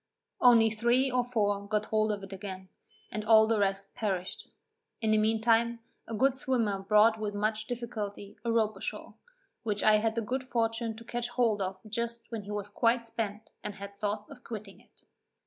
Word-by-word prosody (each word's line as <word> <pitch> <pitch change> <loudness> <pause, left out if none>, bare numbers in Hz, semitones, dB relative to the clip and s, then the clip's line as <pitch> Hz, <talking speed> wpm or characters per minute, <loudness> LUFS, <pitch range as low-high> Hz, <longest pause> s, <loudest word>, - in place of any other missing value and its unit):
Only 230 -3 +6
three 240 +4 +2
or 250 0 +2
four 205 -4 0
got 210 0 0
hold 215 0 +1
of 200 -1 -4
it 195 0 -8
again, 190 -1 -7 0.4
and 215 +1 -3
all 220 0 +7
the 220 -1 +1
rest 195 0 0
perished. 190 -4 -3 0.5
In 220 -2 +1
the 215 - +4
mean 220 +1 +2
time, 235 +1 +3 0.3
a 230 - -4
good 265 +4 +2
swimmer 230 -8 0
brought 210 +3 +4
with 210 -1 -3
much 215 +1 -1
difficulty 210 -4 -5
a 235 - 0
rope 220 -2 +2
ashore, 195 - -5 0.5
which 210 -3 -1
I 215 0 +6
had 220 +1 0
the 230 - 0
good 255 +4 -3
fortune 230 -2 -1
to 225 - -11
catch 240 0 -3
hold 235 -4 +1
of 190 0 -2
just 235 +2 -4
when 225 -2 -3
he 205 - -7
was 205 -1 -3
quite 230 +3 +1
spent, 220 -2 -4
and 210 -1 -5
had 200 0 -8
thoughts 205 +2 -3
of 260 -3 -12
quitting 210 -3 -8
it. - - -26
220 Hz, 195 wpm, -30 LUFS, 205-235 Hz, 0.5 s, all